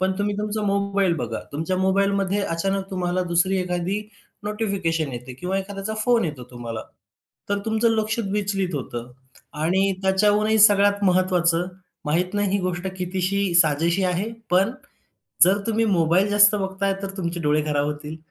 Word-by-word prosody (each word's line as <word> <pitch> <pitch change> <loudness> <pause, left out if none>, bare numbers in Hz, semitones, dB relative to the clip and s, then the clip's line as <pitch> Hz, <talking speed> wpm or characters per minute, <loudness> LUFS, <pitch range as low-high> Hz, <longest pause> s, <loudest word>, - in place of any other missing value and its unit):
पण 190 0 +1
तुम्ही 205 0 0
तुमचा 210 0 -2
मोबाईल 200 -2 +1
बघा. 115 -4 -4
तुमच्या 165 +6 -2
मोबाईलमध्ये 195 +1 +1 0.2
अचानक 195 +2 -2
तुम्हाला 180 -1 -1
दुसरी 185 +3 +2
एखादी 180 +3 -2 0.4
नोटिफिकेशन 190 - -1
येते 125 +1 -7
किंवा 180 +8 -2
एखाद्याचा 195 +2 -5
फोन 240 -5 +3
येतो 145 -6 -5
तुम्हाला, 115 -3 -6 0.7
तर 205 - 0
तुमचं 220 +1 +2
लक्ष 220 0 0
विचलित 195 -4 -1
होतं 125 -3 -5 0.5
आणि 190 +4 +2
त्याच्याहूनही 210 +3 +3
सगळ्यात 205 -1 +5
महत्त्वाचं, 180 -2 +2 0.4
माहीत 180 +6 0
नाही 205 -1 +1
ही 200 - +1
गोष्ट 180 0 -3
कितीशी 185 +2 -1 0.2
साजेशी 165 +5 0
आहे, 185 +5 -1 0.2
पण 195 +6 +3 0.7
जर 190 +3 +3
तुम्ही 225 0 +1
मोबाईल 185 0 +2
जास्त 205 +1 +6
बघताय, 195 0 -1
तर 195 - -3
तुमचे 170 -2 -3
डोळे 150 0 +2
खराब 145 -1 0
होतील. 150 +1 -5
190 Hz, 150 wpm, -23 LUFS, 170-200 Hz, 0.7 s, जास्त